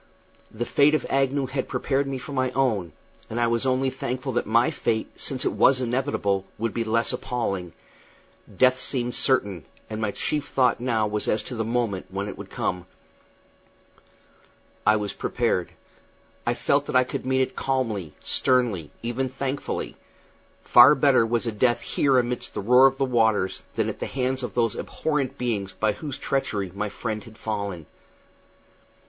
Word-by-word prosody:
The 115 +2 -4
fate 145 +4 +4
of - - -1
Agnew 135 0 +1
had 130 0 -3
prepared 135 0 0
me 135 -1 -3
for 130 - -8
my 130 -2 0
own, 110 -11 +1 0.4
and 115 - -3
I 120 - +3
was 115 +2 0
only 130 +1 +1
thankful 130 +1 -3
that 120 -3 -1
my 115 +3 +3
fate, 110 -1 -1
since 130 -2 -2
it - - +2
was 130 -1 +4
inevitable, 120 -6 0
would 115 0 -2
be 115 - -1
less 115 +2 +1
appalling. 100 -9 -3 0.8
Death 130 0 +4
seemed 125 -2 -1
certain, 100 - +1 0.3
and 110 0 -4
my 110 - 0
chief 150 +8 -2
thought 125 -3 +2
now 115 -3 +1
was 105 0 -2
as 110 - +1
to 125 - -6
the 110 - -1
moment 115 -4 -1
when 100 +2 -3
it - - -6
would - - -9
come. 90 -1 -3 2.0
I 110 - +6
was 105 -1 -2
prepared. 115 -7 -1 0.8
I 120 - +2
felt 140 +3 +1
that - - -4
I 130 - +6
could 125 - -5
meet 130 0 +1
it - - -5
calmly, 115 - -1
sternly, 120 - +1
even 125 +3 -1
thankfully; 135 +2 -4 0.7
far - - +8
better 115 - +4
was 120 +1 0
a 115 - -1
death 120 +3 +2
here 135 -2 +2
amid 125 0 0
the - - -3
roar 125 +6 +7
of 135 0 -2
waters 110 -7 +2
than - - +1
at - - -4
the - - -3
hands 130 0 -1
of 125 - -5
those 115 -3 +1
abhorrent 140 -4 -2
beings 105 -6 -2
by 110 +2 +1
whose 140 +6 -6
treachery 100 -8 -2
my 105 +1 -2
friend 110 0 -4
had 110 -1 -14
fallen. 100 -6 -4
120 Hz, 170 wpm, -25 LUFS, 110-130 Hz, 2.0 s, far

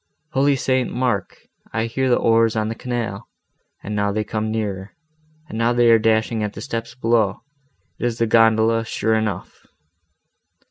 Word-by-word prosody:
Holy 140 0 +3
St. 130 -1 0
Mark! 120 -7 -2 0.3
I 115 0 -1
hear 130 +3 -1
the 120 - +5
oars 115 0 +3
on 110 0 0
the - - -2
canal; 115 -3 -4 0.6
and 105 - -4
now 100 -1 +1
they 105 +1 -1
come 110 +1 -3
nearer, 105 -3 -4 0.5
and 110 - -6
now 115 +1 +2
they 120 -1 +4
are 115 - +6
dashing 110 0 +1
at 105 -1 -2
the 100 - -8
steps 115 -2 -5
below; 115 -5 +1 0.6
it 120 - 0
is 115 -1 -3
the 115 - +2
gondola, 115 0 +4
sure 110 0 -1
enough." 110 -2 -3
115 Hz, 170 wpm, -21 LUFS, 110-120 Hz, 0.6 s, are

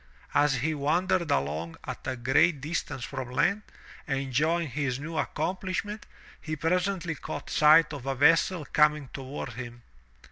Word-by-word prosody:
As 145 -2 +3
he 160 +3 0
wandered 170 +4 +1
along 75 - -1
at - - -7
a 130 - -1
great 135 +6 +3
distance 140 -3 -4
from 130 -1 -5
land, 195 +11 +1 0.5
enjoying 145 +4 0
his 130 -1 -2
new 160 +3 -6
accomplishment, 185 +6 -3 0.3
he 155 -1 -4
presently 180 +2 0
caught 150 - -7
sight 155 +1 +6
of 135 -2 -7
a 135 - 0
vessel 165 +4 +3
coming 150 -2 +2
toward 135 0 -6
him. 120 0 -8
150 Hz, 140 wpm, -28 LUFS, 130-165 Hz, 0.5 s, sight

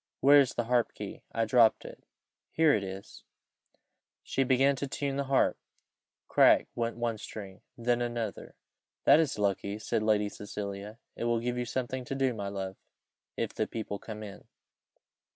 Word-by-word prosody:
Where 145 +1 +7
is 135 -3 +2
the 120 - 0
harp 120 0 +1
key? - - -7
I 115 0 0
dropped 115 0 +4
it - - -11 0.5
here 160 -2 +4
it 105 - +1
is." 95 +1 -8 1.0
She 135 - 0
began 135 +2 +3
to 140 - -3
tune 140 0 -3
the 140 0 -1
harp. 135 0 +2 0.7
Crack - - +5
went 115 0 -2
one 115 -2 -2
string 100 -3 -9 0.2
then 120 0 +1
another. 120 -3 -4 0.5
"That 150 - +7
is 155 -3 +1
lucky," 100 0 -1
said 110 +1 -1
Lady 105 -1 +2
Cecilia, 100 +1 -6 0.2
"it - - -4
will 120 -1 +2
give 120 +1 -2
you 125 0 -2
something 130 +1 -3
to 135 - -4
do, 135 -2 +1
my 100 -3 -4
love, 95 -1 -5 0.6
if - - -2
the - - -1
people 105 -3 -5
come 110 -1 -8
in." 100 -2 -10
115 Hz, 170 wpm, -30 LUFS, 105-130 Hz, 1.0 s, Where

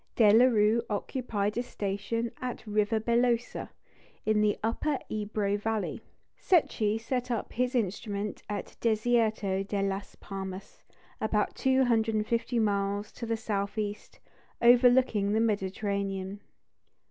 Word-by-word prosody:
De 210 -3 +6
la 235 +3 +7
Rue 225 -1 +3
occupied 210 -1 -2
a - - +2
station 225 +1 -3
at 250 -1 -5
Rivabellosa, 230 +3 +1 0.6
in 215 -1 +3
the 210 -1 +2
Upper 270 +6 0
Ebro 205 -1 -1
valley; 220 0 -2 0.3
Secchi 225 - +2
set 250 +2 -2
up 235 -3 -3
his 250 +2 0
instrument 205 -1 -2
at 205 -1 -5
Desierto 220 -3 +1
de 200 0 -2
las 195 0 -3
Palmas, 190 0 -7 0.4
about 215 -1 +1
250 235 -2 +1
miles 205 -1 0
to 235 - -7
the 230 0 0
south 200 -2 -3
east, 210 -1 -4 0.4
overlooking 240 -4 +5
the 220 - +2
Mediterranean. 200 -2 -1
215 Hz, 115 wpm, -29 LUFS, 205-235 Hz, 0.6 s, la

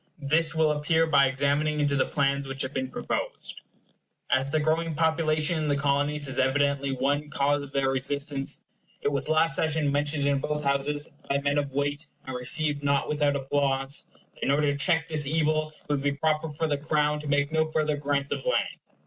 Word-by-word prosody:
This 155 +2 +1
will 160 -1 +3
appear 155 +2 +2
by 140 -3 +4
examining 145 +3 0
into 145 -1 +1
the 135 - +1
plans 140 -1 0
which 135 0 -4
have 130 +1 -5
been 130 -1 -2
proposed. - - -4 0.7
As 135 +1 +2
the 155 - +1
growing 160 +1 0
population 160 0 +1
in 155 - -1
the 145 - +2
Colonies 145 +1 0
is 135 - -3
evidently 140 +1 +1
one 140 +3 -1
cause 145 +1 +1
of 140 -1 -9
their 135 -1 +1
resistance, 140 +1 -1 0.4
it - - +2
was 140 +2 -2
last 155 -2 +3
session 155 -2 +1
mentioned 145 0 +1
in 140 -1 +2
both 150 +2 -2
Houses, 140 +1 0 0.2
by 140 - +2
men 140 +1 +1
of 140 -1 -3
weight, 145 +3 -1 0.2
and 130 - -5
received 145 +4 +1
not 140 -1 +1
without 145 -1 +1
applause, 135 0 -1 0.2
that - - -21
in - - 0
order 145 +1 +3
to - - -2
check 165 +2 +3
this 155 -3 -1
evil 155 0 +1
it - - -6
would 145 -2 0
be 140 0 0
proper 155 +2 0
for 150 +2 -2
the 145 -2 -1
Crown 150 0 +1
to 150 - -7
make 145 +1 +1
no 160 0 +1
further 155 -1 +1
grants 140 -1 -1
of - - -5
land. - - 0
145 Hz, 200 wpm, -27 LUFS, 140-155 Hz, 0.7 s, by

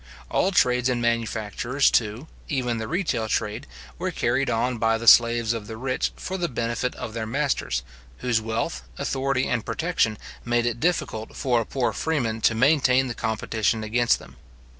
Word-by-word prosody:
All 190 - +2
trades 125 -7 +3
and 125 -1 0
manufactures, 120 +3 0
too, 110 +4 0 0.2
even 125 -5 -1
the 110 - -4
retail 160 - -1
trade, 110 -1 -2 0.3
were - - -1
carried 125 +3 0
on 120 +1 0
by 115 0 +2
the 115 - -6
slaves 115 -1 +6
of 110 -3 -5
the 110 - -7
rich 130 +2 -1
for 190 +1 -5
the 175 -1 -1
benefit 120 0 -2
of 110 - -6
their 110 -1 -3
masters, 130 - -1 0.3
whose 120 -3 0
wealth, 110 - -2 0.2
authority, 135 -1 0
and 120 -3 -1
protection, 160 -11 0 0.3
made 120 0 +1
it 120 -1 -1
difficult 130 -9 -1
for 125 -3 +1
a 115 - -6
poor 130 -3 -1
freeman 120 -9 -1
to 110 - +3
maintain 130 0 +3
the - - -2
competition 110 0 -1
against 120 +2 +2
them. - - -15
120 Hz, 170 wpm, -24 LUFS, 110-130 Hz, 0.3 s, slaves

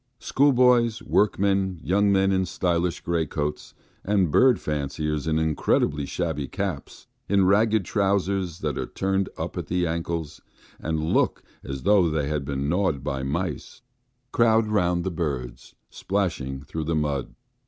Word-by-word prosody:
Schoolboys, 125 -4 +3
workmen, 95 -3 +1
young 100 +3 +2
men 95 0 +3
in 95 -1 +1
stylish 85 0 -1
greatcoats, 75 -3 -2 0.3
and 95 -5 +1
bird 125 - +5
fanciers 75 0 -3
in 80 0 +1
incredibly 75 -2 +1
shabby 80 -5 -2
caps, 95 -6 -5 0.2
in 100 -1 +4
ragged 105 +1 +3
trousers 95 -3 0
that 75 -3 -2
are - - -3
turned 95 0 -1
up - - -4
at - - -6
the 90 0 0
ankles, 85 -2 -3 0.4
and 80 0 -2
look - - +1 0.2
as 70 -1 -6
though 100 -5 +4
they 75 -2 -1
had 75 -2 -2
been 70 0 -2
gnawed 85 -4 0
by 70 -1 -2
mice, 85 - -4 0.5
crowd 115 -1 +4
round 90 -5 +1
the 95 - -2
birds, 65 -8 -4 0.2
splashing 80 -9 -2
through 80 +2 -5
the 80 +1 0
mud. 75 -3 -2
85 Hz, 145 wpm, -25 LUFS, 75-100 Hz, 0.5 s, bird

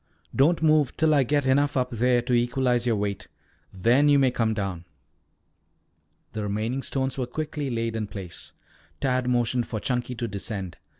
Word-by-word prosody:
Don't 160 +5 +3
move 155 -4 +3
till 160 -1 +3
I 145 - +5
get 145 +2 +1
enough 140 +2 +2
up 125 0 0
there 120 +1 +2
to 125 - -1
equalize 120 0 +1
your 115 - +3
weight. 100 -1 -3 0.4
Then 120 +10 +3
you 145 - +6
may 135 -2 +3
come 110 -2 0
down." 95 -5 -4 1.5
The 110 - -3
remaining 110 +6 -2
stones 135 0 -2
were 125 - -1
quickly 150 +1 -4
laid 115 -2 -2
in 110 -2 -2
place. 95 -4 -8 0.5
Tad 130 -2 0
motioned 120 0 +1
for 110 - -3
Chunky 125 +1 -2
to 120 0 -3
descend. 100 -3 -5
125 Hz, 170 wpm, -25 LUFS, 110-135 Hz, 1.5 s, you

